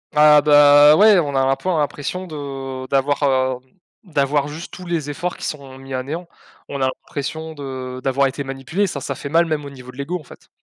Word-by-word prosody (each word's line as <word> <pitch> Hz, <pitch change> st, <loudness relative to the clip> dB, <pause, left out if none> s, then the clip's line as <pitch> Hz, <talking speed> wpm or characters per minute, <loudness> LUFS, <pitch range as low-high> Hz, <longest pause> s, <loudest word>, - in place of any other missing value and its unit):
Ah 150 Hz, 0 st, +7 dB
bah 145 Hz, 0 st, +7 dB
ouais 210 Hz, +1 st, +6 dB
on 145 Hz, -4 st, -2 dB
a 135 Hz, -, +3 dB
l'un 135 Hz, 0 st, +2 dB
peu 185 Hz, -, -4 dB
l'impression 150 Hz, +2 st, -2 dB
de, 160 Hz, -4 st, -9 dB
heu, 135 Hz, -2 st, -6 dB
d'avoir, 140 Hz, +1 st, +1 dB, 0.4 s
hem, 130 Hz, +7 st, -34 dB, 0.3 s
d'avoir 145 Hz, 0 st, +1 dB
juste 155 Hz, +4 st, -8 dB
tous 185 Hz, -2 st, -9 dB
les 155 Hz, -4 st, -2 dB
efforts 180 Hz, +3 st, -4 dB
qui -, -, -6 dB
sont 135 Hz, -3 st, -6 dB
mis 135 Hz, 0 st, -10 dB
à 130 Hz, -, -1 dB
néant, 160 Hz, +7 st, -6 dB, 0.4 s
on 140 Hz, -1 st, -5 dB
a 130 Hz, -, +3 dB
impression 160 Hz, +4 st, -5 dB
de 130 Hz, -3 st, -7 dB
d'avoir 135 Hz, +1 st, +2 dB
été 135 Hz, +1 st, -2 dB
manipulé, 135 Hz, +9 st, -2 dB
ça 140 Hz, -5 st, -5 dB
ça -, -, -3 dB
fait 140 Hz, -, -7 dB
mal 165 Hz, +3 st, +3 dB
même 155 Hz, -3 st, -2 dB
au -, -, -7 dB
niveau 130 Hz, -2 st, -11 dB
de 125 Hz, -, -18 dB
l'ego 170 Hz, +6 st, -3 dB
en 155 Hz, -, -14 dB
fait. -, -, -16 dB
145 Hz, 225 wpm, -20 LUFS, 135-155 Hz, 0.4 s, Ah